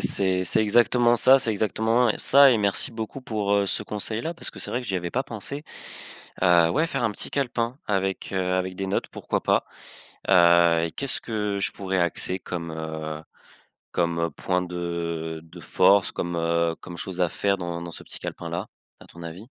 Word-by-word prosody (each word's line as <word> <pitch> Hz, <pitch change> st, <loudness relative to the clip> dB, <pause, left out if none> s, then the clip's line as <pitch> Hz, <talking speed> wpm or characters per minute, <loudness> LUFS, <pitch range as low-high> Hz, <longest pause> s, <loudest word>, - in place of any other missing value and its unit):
c'est 95 Hz, -1 st, +2 dB
c'est 110 Hz, +5 st, +2 dB
exactement 120 Hz, +2 st, +4 dB
ça 130 Hz, +4 st, +7 dB
c'est 115 Hz, -, +1 dB
exactement, 110 Hz, +3 st, +1 dB
heu, 110 Hz, -, +3 dB
ça 140 Hz, 0 st, +6 dB
et 120 Hz, -, +4 dB
merci 100 Hz, +2 st, 0 dB
beaucoup 115 Hz, +3 st, -6 dB
pour, 105 Hz, -5 st, -2 dB
heu, 100 Hz, -1 st, +3 dB
ce 100 Hz, -, +1 dB
conseil-là, 110 Hz, +8 st, -3 dB
parce 170 Hz, -, -6 dB
que -, -, -13 dB
c'est -, -, -6 dB
vrai 125 Hz, -, -1 dB
que 125 Hz, -, -9 dB
j'y 95 Hz, -, -1 dB
avais 85 Hz, -1 st, -3 dB
pas 130 Hz, -, 0 dB
pensé. 135 Hz, +4 st, -6 dB, 0.8 s
Heu, 85 Hz, -2 st, +5 dB
ouais 160 Hz, -, +2 dB
faire 135 Hz, -6 st, -2 dB
un 110 Hz, -, +2 dB
petit -, -, -3 dB
calepin 125 Hz, -2 st, -1 dB
avec, 95 Hz, -2 st, -1 dB
heu, 95 Hz, -1 st, 0 dB
avec 95 Hz, 0 st, -2 dB
des 95 Hz, 0 st, -3 dB
notes 95 Hz, -, -1 dB
pourquoi -, -, -3 dB
pas, -, -, +2 dB, 0.6 s
heu 85 Hz, -2 st, +5 dB
et 85 Hz, -, -5 dB
qu'est-ce 140 Hz, +6 st, -2 dB
que 105 Hz, -3 st, -2 dB
je 95 Hz, -, -1 dB
pourrais 95 Hz, -1 st, -2 dB
axer 90 Hz, +2 st, 0 dB
comme, 85 Hz, -3 st, -5 dB
heu, 80 Hz, -1 st, -5 dB, 0.7 s
comme, 85 Hz, -1 st, 0 dB
heu, 85 Hz, -1 st, 0 dB
point 90 Hz, +4 st, -1 dB
de 85 Hz, -2 st, -4 dB
de 80 Hz, -, -13 dB
force, 100 Hz, -1 st, +3 dB
comme, 85 Hz, -1 st, -3 dB
heu, 85 Hz, 0 st, +1 dB
comme 85 Hz, -, -9 dB
chose 95 Hz, -1 st, -5 dB
à 90 Hz, -, +3 dB
faire 100 Hz, +3 st, 0 dB
dans 85 Hz, -1 st, -4 dB
dans 85 Hz, -, -6 dB
ce -, -, -9 dB
petit -, -, -6 dB
calepin-là, 85 Hz, +4 st, -5 dB, 0.3 s
à -, -, -14 dB
ton 85 Hz, -, -14 dB
avis? 85 Hz, +6 st, -8 dB
95 Hz, 200 wpm, -25 LUFS, 85-110 Hz, 0.8 s, ça